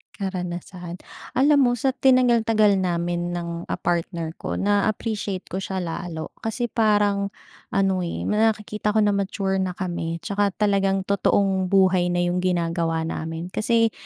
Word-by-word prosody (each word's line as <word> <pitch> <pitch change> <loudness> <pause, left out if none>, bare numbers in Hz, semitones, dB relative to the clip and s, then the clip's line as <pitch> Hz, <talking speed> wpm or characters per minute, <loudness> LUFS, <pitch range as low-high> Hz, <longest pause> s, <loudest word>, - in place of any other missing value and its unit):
Karanasan, 180 -2 -5 0.4
alam 285 +2 +5
mo 245 -2 +3
sa 265 +3 +1
tinagal-tagal 235 -5 +4
namin 175 -1 -1
ng, 170 0 -5
ah, - - -1
partner 170 -2 -2
ko - - -3
na-a-appreciate 205 -1 -1
ko 190 +3 -4
siya 190 -1 -4
lalo 165 -1 -5
kasi 225 +2 -2
parang 205 -3 +2 0.4
ano, 195 -2 +1
eh, 170 - -3
nakikita 210 -1 0
ko 215 - +5
na 205 - +3
mature 195 -1 -1
na 185 -1 -2
kami, 170 -3 -3
tsaka 205 0 +1
talagang 195 -2 +2
totoong 195 -1 +1
buhay 185 -2 +4
na 175 0 +1
yung 175 +1 0
ginagawa 165 -2 0
namin. 165 +2 -5
Kasi 230 +1 +2
195 Hz, 140 wpm, -23 LUFS, 175-210 Hz, 0.4 s, alam